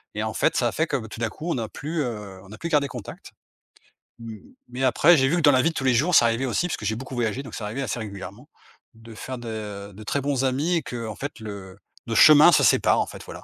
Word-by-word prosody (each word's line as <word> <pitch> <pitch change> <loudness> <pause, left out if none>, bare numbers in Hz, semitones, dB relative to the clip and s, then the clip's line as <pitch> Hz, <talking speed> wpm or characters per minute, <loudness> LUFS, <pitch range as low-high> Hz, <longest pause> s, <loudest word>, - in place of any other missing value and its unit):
et 105 - -2
en 110 - -3
fait, - - +1
ça 120 -2 +1
fait 160 +1 -1
que 140 - -1
b 110 - -7
tout - - -9
d'un 115 -1 -1
coup 155 +9 -9
on - - -1
a 110 - -4
plus, 155 +3 -4
heu, 105 -7 -6
on 100 - -16
a 110 - -10
plus 170 - -5
gardé 145 -3 +2
contact. 125 -7 -10 0.9
Mmh, 115 -1 -8 0.3
mais 130 +2 -5
après 145 +6 +5
j'ai 135 -1 +3
vu 160 - +1
que - - 0
dans 150 -2 +6
la 130 -2 +4
vie 165 - +2
de 165 - -6
tous - - -3
les 130 -1 +3
jours, 155 +9 +2
ça - - +7
arrivait 115 +3 0
aussi 135 +7 -1
parce - - -3
que 105 - -8
j'ai 110 - 0
beaucoup 130 +3 -8
voyagé 120 +2 -2
donc 125 - -11
c'est - - -6
arrivé 110 +7 -4
assez 125 -2 -3
régulièrement 100 -3 -9 0.4
de 115 0 -14
faire 130 +4 -7
de 105 -4 -7
de 105 +3 -11
très 140 +6 -2
bons 140 -1 -1
amis 145 +7 0
et - - -1
qu'en 115 -4 -6
fait 145 -1 -6
le 100 -3 -9 0.3
le 115 - -2
chemin 155 +6 +8
se - - +4
sépare - - +3
en - - -2
fait, - - -10
voilà. - - -10
120 Hz, 280 wpm, -24 LUFS, 110-140 Hz, 0.9 s, chemin